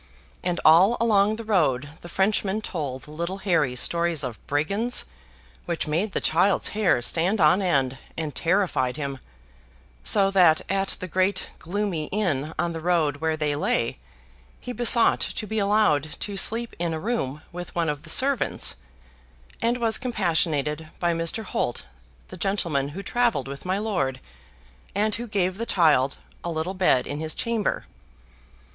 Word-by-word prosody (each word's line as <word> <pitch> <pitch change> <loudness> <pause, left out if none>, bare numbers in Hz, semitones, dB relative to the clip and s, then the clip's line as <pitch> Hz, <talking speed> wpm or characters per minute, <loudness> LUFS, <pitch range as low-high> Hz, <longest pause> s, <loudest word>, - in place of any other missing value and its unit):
And 175 -1 -1
all 180 +9 +6
along 215 -2 +3
the 230 - -7
road 150 - +1
the 175 - -10
Frenchman 200 +2 +1
told 145 -10 -5
little 170 +5 -4
Harry 165 -10 +1
stories 170 +3 +1
of 125 -4 -5
brigands, 200 +12 +1 0.6
which 170 -2 -2
made 175 +7 -1
the - - +1
child's 180 +5 +2
hair 205 - +1
stand 180 - +3
on 165 +4 +4
end, 135 -8 0 0.2
and 155 -3 -3
terrified 170 -8 0
him; 140 -3 -4 0.8
so 195 - +3
that 175 -5 +5
at 195 0 0
the 185 - -5
great 185 +2 0
gloomy 180 -3 -2
inn 160 -7 -1
on 170 -1 -1
the 165 - -5
road 160 -4 +1
where 160 +1 -1
they 150 -2 -1
lay, 120 -5 -1 0.6
he 245 - -6
besought 240 -1 +4
to 215 - -2
be 220 +1 -2
allowed 200 -8 +1
to 205 - -4
sleep 230 +4 +1
in 170 -2 -1
a - - -4
room 155 - -3
with 175 0 -8
one 170 -1 0
of 150 -1 -2
the 155 - -8
servants, 270 - +2 0.8
and 235 +1 +1
was 230 -2 +2
compassionated 160 - 0
by 175 -1 0
Mr. 165 +7 -1
Holt, - - -3 0.4
the 185 - -9
gentleman 170 -7 0
who 190 +7 -7
travelled 235 - 0
with 140 +4 -8
my 185 +1 0
lord, 175 -12 -1 0.8
and 210 +1 +1
who 240 +3 -4
gave 190 -2 -1
the 230 - -3
child 145 -6 +3 0.3
a 175 - -3
little 165 +3 -3
bed 180 -9 +2
in 145 - -5
his 155 0 -2
chamber. 230 -3 -1
175 Hz, 160 wpm, -24 LUFS, 150-205 Hz, 0.8 s, all